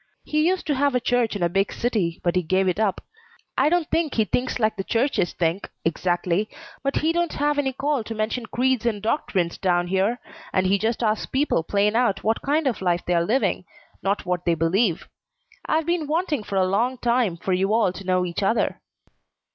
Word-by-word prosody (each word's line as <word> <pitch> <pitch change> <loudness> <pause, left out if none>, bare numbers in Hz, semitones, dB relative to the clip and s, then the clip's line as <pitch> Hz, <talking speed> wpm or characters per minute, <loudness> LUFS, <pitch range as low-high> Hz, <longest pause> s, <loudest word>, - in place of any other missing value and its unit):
He 305 +1 +1
used 370 +1 0
to 300 - +1
have 280 -1 +1
a - - +4
church 245 -3 +1
in 195 - -2
a - - +4
big 195 +3 0
city, 205 -9 -1
but 175 0 +1
he 180 - +3
gave 185 +3 +1
it 185 +2 0
up. 210 -3 +1 0.5
I 280 +3 +3
don't 345 -1 +1
think 325 -4 0
he 220 - +3
thinks 250 +4 -1
like 215 -2 +1
the 195 - -3
churches 230 - 0
think, 170 +3 -1 0.2
exactly, 175 +4 0 0.3
but 275 0 -1
he 320 +2 +2
don't 345 -1 0
have 290 0 +1
any 270 -2 +1
call 280 -1 -1
to 225 - -5
mention 220 +2 -2
creeds 255 0 +1
and 215 -3 0
doctrines 195 - -1
down 175 -2 +1
here, 195 +6 +1 0.3
and 185 - +2
he 195 +2 +2
just 230 +3 -1
asks 215 -1 0
people 270 - +1
plain 205 +5 +1
out 235 -5 +1
what 220 +1 +1
kind 300 +3 +1
of 255 -7 -1
life 175 -1 +1
they're 175 -1 +2
living, 240 +10 +1 0.4
not 200 +1 -1
what 180 -1 -1
they 170 - +2
believe. 170 +3 +1 0.6
I've 315 0 +1
been 340 -2 0
wanting 315 -3 0
for 205 - -6
a 190 -1 +3
long 230 +7 0
time 235 -7 +1
for 185 +3 -2
you 190 +2 +1
all 220 -5 +2
to 195 - -9
know 185 -1 +1
each 175 +3 -3
other." 210 +4 0
215 Hz, 210 wpm, -24 LUFS, 185-260 Hz, 0.6 s, a